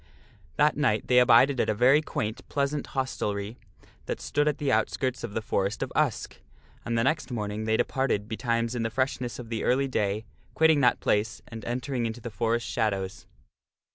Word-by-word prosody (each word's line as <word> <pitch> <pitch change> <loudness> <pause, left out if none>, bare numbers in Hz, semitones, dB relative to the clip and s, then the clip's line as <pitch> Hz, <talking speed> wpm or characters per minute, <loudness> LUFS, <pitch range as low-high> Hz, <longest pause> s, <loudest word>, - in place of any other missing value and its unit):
That - - +3
night - - +1
they 125 0 +5
abided 125 +2 +5
at - - +1
a 110 - +1
very 130 +7 +5
quaint, 110 -7 -3
pleasant 140 0 -1
hostelry 105 -4 -2 0.5
that - - -3
stood 145 +1 0
at 150 - +1
the 140 -2 0
outskirts 125 +3 0
of 110 -3 -6
the 110 - -2
Forest 100 -2 -1
of - - -6
Usk, - - -1 0.4
and 115 0 -1
the 115 - +2
next 155 +5 0
morning 105 -2 -3
they 110 0 +2
departed 130 -7 0
betimes 115 0 -1
in 120 - -2
the 115 - 0
freshness 125 0 -2
of 120 -2 -9
the 115 -2 -3
early 135 +2 +2
day, 105 -3 -1 0.3
quitting 160 -2 +4
that 125 - +3
place 105 0 0
and 115 -3 -8
entering 125 0 -2
into 115 +1 -6
the 120 0 -7
forest 115 +1 0
shadows. 100 -3 -2
120 Hz, 185 wpm, -27 LUFS, 110-130 Hz, 0.5 s, they